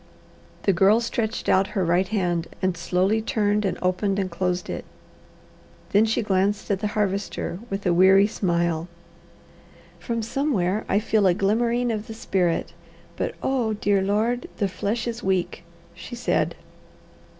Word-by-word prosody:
The 195 - +3
Girl 195 +5 +5
stretched 230 -1 -2
out 190 +1 +4
her 190 - +2
right 175 +3 +2
hand 175 -5 -1
and 185 -2 0
slowly 185 +5 +1
turned 210 -1 0
and 190 - -1
opened 190 +2 0
and 190 -2 -1
closed 180 +1 -1
it. - - -4 1.1
Then 210 +2 +5
she 225 +1 0
glanced 200 +1 0
at 195 - +1
the 210 - -1
Harvester 195 -3 -2
with 195 +1 -4
a 180 - +3
weary 190 +3 +6
smile. 170 -5 0 1.1
"From 230 -1 -3
somewhere 215 -6 0
I - - +3
feel 210 -1 +2
a 175 - +3
glimmering 235 +5 +1
of 215 -1 -4
the 220 - -7
spirit, 180 -6 -1 0.4
but - - -3
Oh, 245 -5 0
dear 205 -2 +1
Lord, 220 +5 0
the 200 - +1
flesh 200 +5 -2
is 235 0 -4
weak!" 185 -4 -1 0.3
she - - -9
said. 240 - 0
200 Hz, 150 wpm, -24 LUFS, 185-220 Hz, 1.1 s, weary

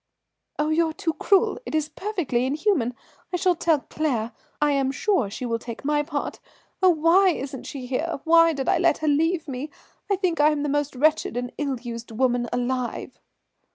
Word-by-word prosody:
"Oh, 300 +1 0
you're 320 0 +2
too 325 0 -2
cruel, 400 +7 +2
it 385 - -5
is 310 -1 +1
perfectly 325 - -2
inhuman. 285 - 0 0.4
I 360 - 0
shall 365 0 +3
tell 325 -3 +1
Claire, 245 -9 -2 0.3
I 295 0 +3
am 270 -1 +1
sure 370 - +1
she 235 +5 -5
will 230 -1 -1
take 235 +3 -8
my 295 0 +2
part. 295 - -4 0.4
Oh, 375 - +6
why 345 +4 +5
isn't 270 -5 -4
she 265 -3 -6
here, 280 +5 -2
why 330 0 +6
did 270 -2 -4
I - - +3
let 340 -1 +3
her 310 - -3
leave 320 +3 +1
me? 270 +2 -5 0.4
I - - +5
think 365 -4 -1
I 300 - +6
am 300 -1 -1
the 295 - -1
most 290 -1 -1
wretched 305 -1 +2
and 245 0 -3
ill 275 -4 -1
used 235 -1 -7
woman 245 0 0
alive." 245 0 -3
295 Hz, 190 wpm, -24 LUFS, 255-330 Hz, 0.4 s, Oh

